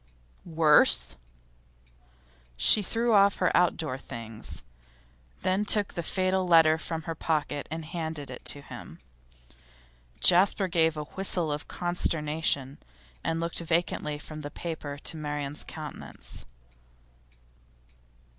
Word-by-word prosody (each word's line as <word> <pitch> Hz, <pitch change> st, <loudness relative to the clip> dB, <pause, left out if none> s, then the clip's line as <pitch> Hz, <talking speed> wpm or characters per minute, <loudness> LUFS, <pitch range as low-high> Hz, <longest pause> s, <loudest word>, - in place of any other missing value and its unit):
'Worse?' 160 Hz, -3 st, +4 dB, 1.4 s
She 135 Hz, -, +5 dB
threw 230 Hz, +4 st, 0 dB
off 200 Hz, -1 st, +6 dB
her 180 Hz, -, +2 dB
outdoor 160 Hz, -6 st, +1 dB
things, 115 Hz, -3 st, -6 dB, 0.8 s
then 185 Hz, +2 st, +2 dB
took 205 Hz, -1 st, +2 dB
the 170 Hz, -, -2 dB
fatal 185 Hz, +2 st, 0 dB
letter 160 Hz, -2 st, +6 dB
from 165 Hz, -1 st, -4 dB
her 165 Hz, -, -3 dB
pocket 150 Hz, -2 st, -2 dB
and 160 Hz, +1 st, -5 dB
handed 160 Hz, -4 st, -5 dB
it 125 Hz, -, -9 dB
to 145 Hz, -, 0 dB
him. -, -, -10 dB, 1.2 s
Jasper 190 Hz, +2 st, +5 dB
gave 165 Hz, -3 st, +2 dB
a 150 Hz, -, -2 dB
whistle 175 Hz, -1 st, -1 dB
of 145 Hz, +1 st, -4 dB
consternation, 155 Hz, -5 st, 0 dB, 0.4 s
and 165 Hz, 0 st, -1 dB
looked 170 Hz, 0 st, 0 dB
vacantly 165 Hz, -3 st, -1 dB
from 155 Hz, +1 st, -9 dB
the 145 Hz, -, -6 dB
paper 150 Hz, -3 st, -6 dB
to 160 Hz, -, -2 dB
Marian's 145 Hz, -1 st, -2 dB
countenance. 155 Hz, -2 st, -9 dB
160 Hz, 115 wpm, -28 LUFS, 150-175 Hz, 1.4 s, off